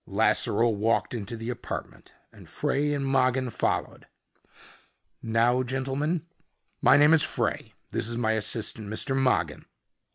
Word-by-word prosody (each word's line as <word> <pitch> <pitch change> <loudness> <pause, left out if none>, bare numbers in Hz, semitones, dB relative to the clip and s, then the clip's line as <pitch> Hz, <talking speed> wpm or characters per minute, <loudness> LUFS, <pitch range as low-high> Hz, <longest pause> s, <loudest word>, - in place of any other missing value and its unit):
Lasseroe 115 +3 +2
walked 110 +4 0
into 115 0 -5
the 115 +2 -4
apartment 120 - -8 0.2
and - - -14
Frey 145 +1 0
and 140 -1 -1
Mogin 130 -2 +1
followed. - - -2 1.1
"Now, 115 +3 +2
gentlemen?" 135 +6 -2 0.6
"My - - +6
name 150 +2 +6
is 160 - +5
Frey. - - -2 0.2
This 115 - -2
is 120 0 -3
my 110 -2 +1
assistant, 110 0 -2
Mr. 135 +5 0
Mogin." 125 - 0
125 Hz, 130 wpm, -27 LUFS, 115-135 Hz, 1.1 s, My